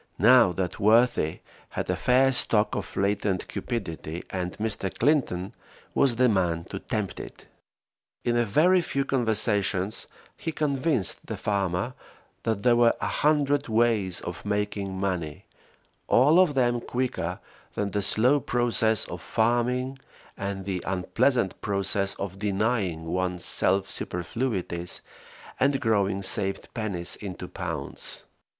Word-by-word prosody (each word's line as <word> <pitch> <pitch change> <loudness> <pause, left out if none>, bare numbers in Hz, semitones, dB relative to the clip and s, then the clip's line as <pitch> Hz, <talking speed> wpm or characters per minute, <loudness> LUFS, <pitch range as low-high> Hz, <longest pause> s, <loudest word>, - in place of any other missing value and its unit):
Now 115 0 +6
that 90 0 -3
worthy 110 -6 +3 0.3
had - - -4
a - - 0
fair 130 +2 +3
stock 110 -4 +2
of - - -5
latent 100 -1 0
cupidity, 85 -8 -5
and 90 -1 -4
Mr. 105 -3 -1
Clinton 115 - +1 0.4
was 135 -4 +3
the 125 +2 +4
man 90 -6 +1
to 95 - -4
tempt 105 -4 -3
it. - - -10 0.8
In 120 - +1
a 120 - +3
very 170 - +4
few 140 -4 -2
conversations 105 -6 +1 0.3
he 165 - -4
convinced 140 - 0
the - - -4
farmer 100 +2 -1 0.5
that 110 -3 -2
there 120 -1 +5
were 120 -1 +4
a - - -2 0.2
hundred 145 -1 +2
ways 110 -5 +2
of 90 -1 -7
making 105 -2 -2
money, 90 -6 -3 0.6
all 145 +8 +5
of 175 -6 +4
them 120 -2 +2
quicker 95 -10 -2 0.4
than 100 -1 -1
the 105 - 0
slow 125 +8 +3
process 120 -3 +2
of 85 -1 -7
farming 125 +6 0 0.4
and 100 -1 -4
the 95 -2 -2
unpleasant 95 +4 0
process 100 -1 0
of 95 -1 -6
denying 100 -5 0
one's 90 +1 -1
self 95 +1 +2
superfluities 90 -2 -3 0.6
and 135 +1 +2
growing 100 -3 +1
saved 95 0 0
pennies 100 -6 -2
into 95 -3 -7
pounds. 80 -7 -5
105 Hz, 130 wpm, -26 LUFS, 95-125 Hz, 0.8 s, Now